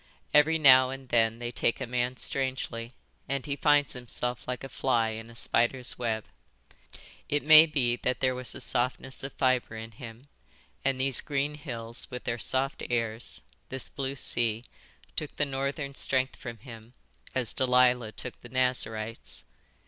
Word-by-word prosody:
Every 150 +2 +5
now 130 -4 +7
and 135 -1 -8
then 115 -1 +2
they 120 0 -5
take 115 - 0
a 130 - -3
man 125 +1 -2
strangely, 130 -3 -2 0.3
and 135 -2 -2
he 140 - -2
finds 145 -1 +3
himself 125 0 -4
like 125 0 -4
a 135 - -6
fly 120 -3 +1
in 110 +1 -7
a 115 - -14
spider's 120 +2 +2
web. 110 -3 -2 1.0
It 145 0 0
may 155 +2 +9
be 125 -6 0
that 125 +1 -1
there 130 -1 +2
was 125 -1 -4
a - - -5
softness 130 +2 -1
of 135 - -5
fibre 130 -3 +1
in 110 +1 -7
him, 115 +3 -11 0.6
and 135 -1 0
these 135 -1 +2
green 145 0 -1
hills 120 -5 -5
with 125 -1 -7
their 120 - -2
soft 135 +5 0
airs, 115 -1 -3 0.3
this 130 -1 -2
blue 135 0 -3
sea, 120 -3 +3 0.5
took 150 - -3
the 145 - +1
northern 140 +1 -3
strength 130 -1 +1
from 120 -2 -8
him 115 -1 -12 0.4
as 125 -4 +1
Delilah 125 -3 +3
took 125 - -8
the 120 - -12
Nazarite's. 115 -3 -2
125 Hz, 165 wpm, -28 LUFS, 120-135 Hz, 1.0 s, may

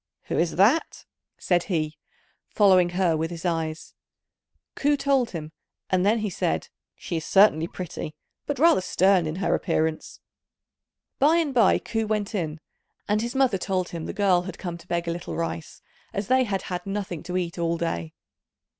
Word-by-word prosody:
"Who - - 0
is 170 0 +1
that?" 225 - +2 0.3
said 175 -2 +1
he, 155 -5 -2 0.5
following 185 -4 +5
her 180 -4 +3
with 160 +1 -1
his 170 0 -7
eyes. 160 -2 -2 0.8
Ku 290 0 +1
told 275 -4 +2
him, 155 -3 -6 0.4
and 185 -1 +3
then 210 +4 +3
he 215 -2 -2
said, 80 - -1 0.3
"She 170 - -4
is 160 - -4
certainly 190 -5 +5
pretty, 165 -4 -6 0.3
but 290 - -2
rather 320 - +5
stern 185 -1 +3
in 155 - -3
her 195 - 0
appearance." 160 -2 -1 1.0
By 300 +4 +5
and 320 -5 +1
by 230 -6 +5
Ku 225 -1 -3
went 210 -1 -1
in, 160 -6 -3 0.5
and 210 +1 +1
his 235 +3 -4
mother 260 -8 +2
told 185 -1 -1
him 165 -1 -6
the - - -3
girl 190 -3 +3
had 180 0 -7
come 175 -2 -5
to 170 - -17
beg 170 0 -2
a - - 0
little 175 +1 -5
rice, 165 -1 -5 0.3
as 200 0 -3
they 260 0 +4
had 195 -4 -2
had 180 0 -5
nothing 195 -5 -3
to 180 0 -3
eat 175 -1 -3
all 170 0 0
day. 85 - -3
185 Hz, 180 wpm, -25 LUFS, 165-210 Hz, 1.0 s, following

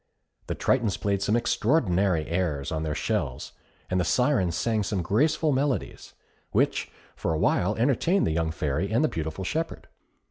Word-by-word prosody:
The - - -2
Tritons 115 -7 +1
played 100 -2 0
some 105 +2 +1
extraordinary 100 - +2
airs 80 -5 -2
on 80 -1 -2
their 75 -2 -2
shells, 60 - -2 0.4
and 90 - 0
the - - +2
Syrens 95 - +2
sang 110 +6 0
some 95 -2 -2
graceful 150 - +2
melodies, 135 0 -2 0.3
which - - +1 0.3
for - - -2
a - - 0
while 95 +6 +2
entertained 140 - +2
the - - 0
young 80 0 0
Fairy 80 +5 -2
and 120 +7 +2
the - - +4
beautiful 80 - -4
shepherd. 160 - -3
100 Hz, 165 wpm, -26 LUFS, 80-125 Hz, 0.4 s, the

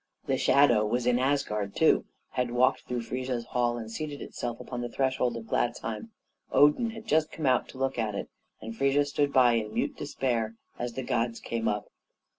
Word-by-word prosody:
The - - +1
shadow 125 -6 +5
was 120 +3 0
in 125 0 +3
Asgard, 105 -7 0
too - - +4 0.3
had 125 -1 -1
walked 125 +2 +2
through 120 -1 -2
Frigga's 125 0 -3
hall 120 -1 0
and 110 -1 -6
seated 145 +3 -5
itself 120 -1 -5
upon 125 -1 -5
the 120 - -3
threshold 130 -2 0
of 115 - -7
Gladsheim. 120 - -2 0.4
Odin 150 +11 +5
had 225 0 -9
just 155 -7 +2
come 155 - -4
out 130 -2 +3
to - - -11
look 135 -1 -1
at 105 -3 -1
it, - - -4 0.3
and 115 +1 -7
Frigga 140 +3 +3
stood 145 0 0
by 125 -3 +5
in 110 -2 -1
mute - - 0
despair 115 -4 -2 0.2
as 120 -1 -3
the 130 - -4
gods 115 -1 -1
came 115 -1 -2
up. 105 0 -2
120 Hz, 195 wpm, -28 LUFS, 115-135 Hz, 0.4 s, shadow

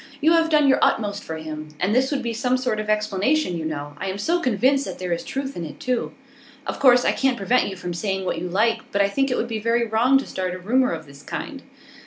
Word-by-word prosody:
You 315 +3 +4
have 330 -1 +4
done 300 -2 +4
your 270 - +4
utmost 205 -2 +1
for 160 - -5
him. 155 -1 -7
And 190 +4 +1
this 260 +2 +3
would 275 -3 -2
be 235 -1 -2
some 250 +2 +1
sort 250 -4 -1
of 215 0 -4
explanation, 215 - +1
you 160 -1 -4
know. 145 -2 -4
I 195 - -3
am 190 - -4
so 335 +12 +1
convinced 260 - +2
that - - -6
there 180 -1 -4
is 170 - -3
truth 270 0 -4
in 175 - -4
it, 155 - -8
too.' 250 -1 -1 0.5
'Of - - -4
course 250 -2 +6
I - - +4
can't 265 -2 +1
prevent 225 +6 +2
you 195 - -6
from 180 -1 -5
saying 190 +1 -2
what 165 - -1
you 180 - -4
like, 220 +6 +2
but 200 0 +3
I - - +3
think 270 +6 0
it 250 - 0
would 230 - -1
be 225 -2 -3
very 230 +2 +1
wrong 230 +4 +3
to 270 - -2
start 185 -1 -3
a - - -5
rumour 250 +8 +1
of 160 -2 -5
this 140 0 -14
kind. - - -6
220 Hz, 270 wpm, -23 LUFS, 185-260 Hz, 0.5 s, course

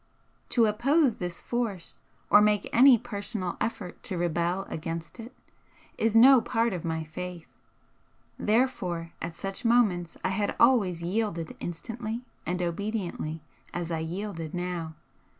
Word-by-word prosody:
To 235 -3 +4
oppose 245 +5 +2
this 175 -1 -4
force 225 -8 -3 0.3
or 205 - +8
make 210 -1 +3
any 255 +1 +8
personal 205 -5 -4
effort 195 -5 -4
to 195 -7 -2
rebel 175 +2 0
against 165 +6 -5
it, 230 +2 -8 0.6
is 225 0 +1
no 255 +2 +8
part 230 -1 0
of 175 - -4
my 160 -1 -2
faith, 175 +2 -7 0.9
therefore 195 -8 0
at 170 -1 -4
such 195 +6 -5
moments 210 -8 +2
I - - +1
had 205 +2 0
always 200 -9 +4
yielded 175 -3 -2
instantly 225 +6 -5 0.2
and 180 +1 -1
obediently 175 -4 -3 0.3
as 175 -1 -3
I 165 - -1
yielded 165 -1 -4
now. 175 -3 -3
190 Hz, 135 wpm, -28 LUFS, 170-230 Hz, 0.9 s, or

